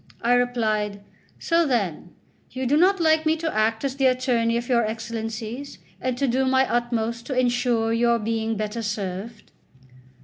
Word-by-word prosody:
I 240 +1 +3
replied: 215 -5 0 0.3
"So, 335 0 +2
then, 190 - -2 0.3
you 260 +1 -4
do 270 +4 +2
not 370 +5 +4
like 315 -1 +3
me 315 0 +2
to 320 0 -3
act 220 +2 +1
as 270 -1 -2
the 270 -1 +4
attorney 245 -2 +1
of 235 0 -4
your 235 -2 +3
Excellencies, 225 +3 -5 0.2
and 255 -1 -1
to 280 - +1
do 260 +2 +1
my 265 0 +3
utmost 235 -1 -1
to 265 - -3
ensure 240 -2 +1
your 235 0 +3
being 225 0 -2
better 215 +2 -3
served? 210 +1 -5
235 Hz, 165 wpm, -24 LUFS, 220-255 Hz, 0.3 s, not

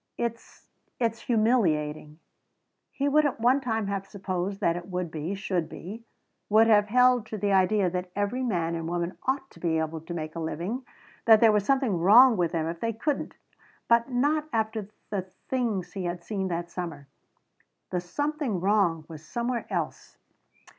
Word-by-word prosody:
"It's 235 -1 -5 0.3
it's 230 -2 0
humiliating." 160 -11 +1 0.7
He 280 - -2
would 305 +2 +4
at 290 -5 -1
one 250 +4 +3
time 225 -4 -1
have 195 -1 -3
supposed 190 0 -3
that 170 - +2
it 175 0 -6
would 180 -3 -3
be, 160 +5 -3
should 185 -4 -2
be; 210 +9 -8 0.5
would 215 +2 +6
have 210 -2 +5
held 250 0 +4
to 215 - -5
the 200 0 0
idea 195 +1 +3
that 180 +1 -3
every 205 +5 -1
man 175 -9 0
and 165 -1 -3
woman 175 +1 -2
ought 270 0 -1
be 165 -2 0
able 160 0 -2
to 170 +2 -7
make 155 -1 -5
a - - -4
living, 180 - -4 0.4
that 220 -2 +8
there 225 -1 +6
was 210 -1 +1
something 260 -9 +2
wrong 230 +8 +7
with 175 -4 0
them 160 -2 -1
if 165 +1 -4
they 230 +3 -1
couldn't. 280 +6 -2 0.5
But 235 +2 +3
not 295 +5 +1
after 220 -3 -1 0.2
the 200 -2 0 0.3
things 220 -9 -1
he 190 -2 -4
had 175 0 -4
seen 195 0 -2
that 170 -1 -3
summer. 165 -6 -6 0.8
The 180 -1 -1
something 285 - -2
wrong 180 -5 +2
was 160 -2 -10
somewhere 235 +4 -3
else. - - -4
200 Hz, 175 wpm, -27 LUFS, 175-235 Hz, 0.8 s, that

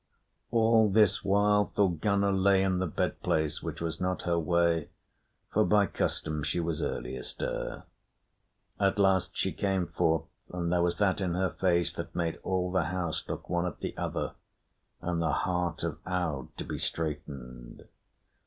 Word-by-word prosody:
All 115 -2 +4
this 105 0 +4
while 105 +1 +4
Thorgunna 100 +1 +2
lay 95 0 +4
in 95 -1 +1
the 95 - 0
bed - - -2
place, 80 -1 0
which - - -5
was 85 +1 -3
not 90 0 -1
her 85 -1 +1
way, 85 -1 +2 0.6
for 110 - +4
by 105 -1 +4
custom 75 -5 -2
she 75 +4 -1
was 85 -2 -1
early 60 +2 -3
astir. - - -4 1.0
At 100 0 +2
last 95 -2 +2
she - - +1
came 95 -3 0
forth, 80 -1 +1 0.3
and 85 -1 -1
there 90 - +3
was 85 0 +2
that 100 0 +1
in 90 -2 0
her 95 0 +1
face 85 -3 +1
that - - -6
made 85 -2 -1
all 90 -1 -1
the 90 -3 +2
house 85 -1 -2
look - - -5
one 90 0 0
at 90 - -7
the - - -4
other - - -2 0.7
and 85 -1 -1
the 85 - +1
heart 90 -2 -1
of - - -3
Aud 85 -8 -1
to - - -3
be - - -5
straitened. 70 -6 -5
90 Hz, 165 wpm, -29 LUFS, 80-95 Hz, 1.0 s, All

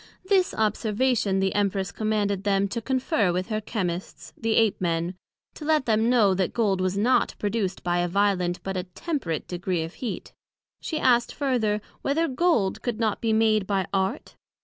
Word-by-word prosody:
This 375 -2 +2
Observation, 215 -1 +1
the 190 0 +1
Empress 195 -3 0
commanded 205 -1 -1
them 200 -1 +2
to 230 +3 -3
confer 260 - +1
with 185 +4 -2
her 215 -1 -1
Chymists, 185 -5 -4
the 225 -1 -1
Ape 225 -4 +3
men; 170 0 0 0.4
to - - -10
let 305 -3 +2
them 225 0 +2
know 220 -6 +4
that 185 -1 -1
Gold 200 -5 +1
was 185 +1 0
not 240 +5 +2
produced 205 -3 -2
by 175 -1 +1
a 175 - +1
violent, 180 -2 +1
but 195 0 -3
a 180 -1 -2
temperate 180 - -3
degree 180 -1 -2
of 165 - -7
heat. 245 - -6 0.5
She 315 - -3
asked 240 -3 +3
further, 230 -7 0 0.2
Whether 320 +4 +1
Gold 255 - +1
could 235 -2 -3
not 220 -3 0
be 225 - +1
made 220 -2 +3
by 195 -2 0
Art? 190 0 -1
205 Hz, 175 wpm, -25 LUFS, 190-235 Hz, 0.5 s, know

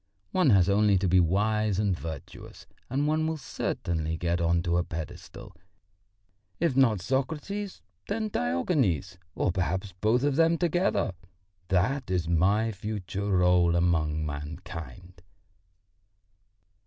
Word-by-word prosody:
One 180 -6 +3
has 95 -5 +5
only 100 0 +4
to 95 +1 0
be 90 +1 +4
wise 105 +3 +1
and 100 -3 +1
virtuous 80 -4 -9 0.2
and 140 +3 0
one 155 +1 +1
will 160 0 -2
certainly 80 - -3
get 85 0 -1
on 85 0 +2
to 85 -1 +1
a 90 - +2
pedestal. 80 -3 -8 1.0
If 165 -7 +1
not 115 -8 +3
Socrates, 160 - -3 0.2
then 215 +1 -2
Diogenes, 90 - 0 0.2
or - - +1
perhaps 95 +2 -2
both 115 +4 +2
of 145 -1 +1
them 165 0 +4
together 175 - +1 0.5
that 105 +8 0
is 90 -3 0
my 100 +7 +2
future 100 -1 -4
rôle 90 -2 +3
among 80 -3 +1
mankind." 80 +2 -8
95 Hz, 125 wpm, -28 LUFS, 85-130 Hz, 1.0 s, has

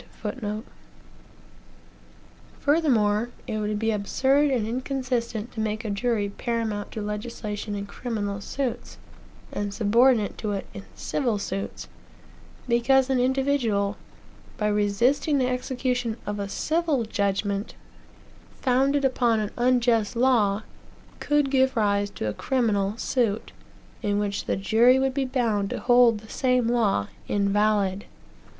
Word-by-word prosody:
Furthemore, 240 -8 +2 0.2
it 215 - -3
would 210 0 -1
be 225 +1 0
absurd 265 +8 +2
and 240 -5 0
inconsistent 245 -2 -2
to 225 - -8
make 215 +1 -2
a 215 - -2
jury 210 0 0
paramount 220 -1 -3
to 215 - -4
legislation 210 -1 -4
in 200 0 -4
criminal 205 -2 -4
suits, 265 +2 -4 0.5
and 205 0 -3
subordinate 230 +2 +3
to 210 -2 -2
it 195 - -3
in 195 - -8
civil 240 -7 -1
suits; 195 -1 -5 0.8
because 255 +3 +3
an 260 - +2
individual, 250 -6 +1 0.6
by 210 - 0
resisting 210 +8 +2
the 260 - +2
execution 250 -2 -1
of 205 0 -3
a 200 0 -3
civil 315 0 0
judgment, 200 0 -1 0.8
founded 270 +2 +2
upon 240 -4 +2
an 210 -1 -2
unjust 240 -3 +2
law, 225 -5 +3 0.6
could 295 -2 +1
give 265 -2 +2
rise 205 -1 +2
to 155 - -5
a 105 - -1
criminal 215 -6 0
suit, 230 -4 -1 0.5
in 205 -1 0
which 205 -1 -2
the - - -1
jury 225 +6 +4
would 265 0 +1
be 270 0 0
bound 230 -6 0
to - - -3
hold 245 -2 +5
the 220 - -14
same 250 -1 +1
law 215 - +1 0.2
invalid. 205 -1 +1
225 Hz, 125 wpm, -25 LUFS, 205-255 Hz, 0.8 s, hold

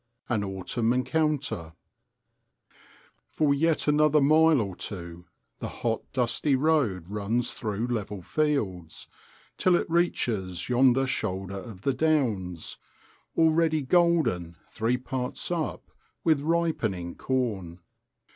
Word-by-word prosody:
An 110 -4 +1
Autumn 100 +5 -1
Encounter 130 - -1 1.6
For 150 -2 +2
yet 160 +2 +1
another 150 0 +4
mile 155 +1 +5
or 100 -4 -3
two 85 -3 -6 0.3
the - - -4
hot 115 -1 -2
dusty 130 +3 +1
road 130 - +1
runs 105 +4 -1
through 110 0 -3
level 105 -5 -3
fields, 100 - -2 0.5
till 185 -1 +4
it - - 0
reaches 110 - 0
yonder 130 +1 +4
shoulder 95 -6 -3
of 100 -2 -11
the 135 - +1
downs, 115 - -1 0.6
already 160 -1 +3
golden 150 - +2
three 120 +2 0
parts 125 +4 -4
up 165 -3 -3 0.3
with 155 -4 +3
ripening 145 - -1
corn. 105 -10 -2
125 Hz, 110 wpm, -27 LUFS, 95-155 Hz, 1.6 s, mile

